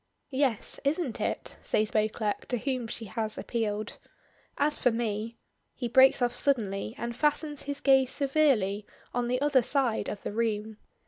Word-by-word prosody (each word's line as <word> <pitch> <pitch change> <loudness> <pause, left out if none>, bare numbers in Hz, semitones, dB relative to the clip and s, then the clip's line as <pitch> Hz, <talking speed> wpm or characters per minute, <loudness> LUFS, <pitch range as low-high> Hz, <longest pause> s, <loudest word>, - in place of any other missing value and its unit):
"Yes; 260 -5 0
isn't 285 -3 -1
it?" - - -3
says 215 0 +1
Beauclerk, 215 -1 -1
to 245 - 0
whom 255 -1 -2
she 225 0 -5
has 215 +2 -3
appealed. 215 -2 -3 0.6
"As 295 +1 +2
for 250 - +4
me 225 -1 -2 0.2
" - - -48
He 245 - -3
breaks 260 +2 +5
off 245 0 +1
suddenly 220 -6 0
and 235 0 -4
fastens 295 +1 +1
his 285 0 -4
gaze 265 -2 +5
severely 265 -9 +2 0.3
on 245 0 0
the 250 +1 0
other 285 -3 +4
side 250 -2 +1
of 205 - -6
the - - -4
room. 220 -1 -1
240 Hz, 160 wpm, -29 LUFS, 215-270 Hz, 0.6 s, breaks